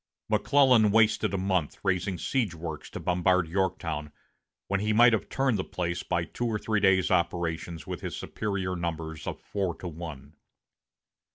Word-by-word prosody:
McClellan 115 +1 +5
wasted 110 -1 +3
a 100 - -1
month 95 -4 0
raising 95 -1 0
siege 110 -4 -1
works 80 -2 -6
to - - -7
bombard 90 0 +2
Yorktown, 85 -4 -2 0.5
when 100 0 0
he 105 +2 0
might 120 +2 +7
have 105 -3 -1
turned 135 -6 +1
the - - 0
place 85 -1 -3
by - - -1
two 120 - -3
or 110 -2 0
three 110 0 0
days' 95 -2 +3
operations 85 -1 -1
with - - -5
his - - -4
superior 95 -3 -3
numbers 80 -2 -4
of - - -4
four 95 -4 -2
to 90 - -7
one. 80 -4 -8
95 Hz, 165 wpm, -28 LUFS, 85-105 Hz, 0.5 s, might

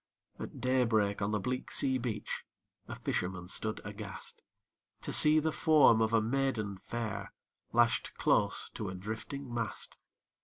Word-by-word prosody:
At - - -7
day 130 0 +3
break, 105 -3 +1
on 100 - +1
the 105 0 0
bleak 125 +4 -3
sea 130 -1 +2
beach 115 -4 -3 0.4
A - - -5
fisherman 90 -1 -2
stood 110 +3 -2
aghast, 105 -1 -7 0.6
To - - -2
see 150 +1 +6
the 155 +1 +2
form 150 -8 +5
of 110 0 +2
a 115 - +5
maiden 110 -4 -1
fair 115 -1 -4 0.4
Lashed - - +2
close - - +2
to - - -4
a 95 - -5
drifting 110 +7 -5
mast. 115 -2 -2
110 Hz, 150 wpm, -32 LUFS, 105-130 Hz, 0.6 s, see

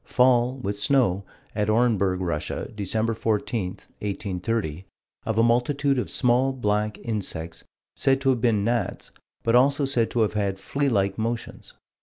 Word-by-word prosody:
Fall, 125 0 +3
with 100 -4 -4
snow, 105 -7 +2 0.3
at 105 0 0
Orenburg, 105 -5 +2
Russia, 85 -4 -2
Dec. 110 +2 -1
14, 110 -2 -1 0.3
1830, 95 -3 -3 0.4
of 110 - -1
a 115 - +5
multitude 130 +4 +2
of - - -3
small, 125 +1 +2
black 105 -3 -1
insects, 95 -8 -4 0.3
said 135 0 +2
to 135 -1 +3
have 125 -3 -1
been 110 -4 +2
gnats, 120 +2 -2 0.3
but 115 +1 +2
also 140 +3 +4
said 125 -4 +1
to 120 - 0
have 105 -1 +1
had 100 -2 -1
flea 140 +8 -1
like 100 -3 0
motions. 115 +1 -4
115 Hz, 150 wpm, -25 LUFS, 100-125 Hz, 0.4 s, a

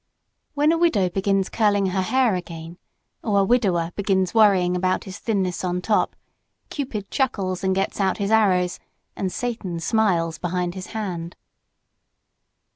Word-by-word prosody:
When 295 +2 +3
a 330 - +1
widow 220 - +3
begins 195 +1 0
curling 205 -3 +2
her 190 0 0
hair, 250 +4 +2
again, 170 -1 -6 0.4
or 200 -3 +2
a - - +2
widower 190 -8 +1
begins 190 -2 0
worrying 195 -5 +4
about 185 +1 0
his 190 +1 -9
thinness 190 -6 -1
on 180 0 -1
top, 210 +3 +1 0.6
Cupid 230 -9 -4
chuckles 195 -9 -1
and 190 0 +1
gets 195 +1 -1
out 190 -1 +1
his 200 0 -2
arrows 185 -5 +3 0.4
and 190 -2 -2
Satan 220 -8 -3
smiles 165 -4 +1
behind 175 0 -2
his 185 0 -7
hand. 175 -5 -4
190 Hz, 145 wpm, -23 LUFS, 180-215 Hz, 0.6 s, worrying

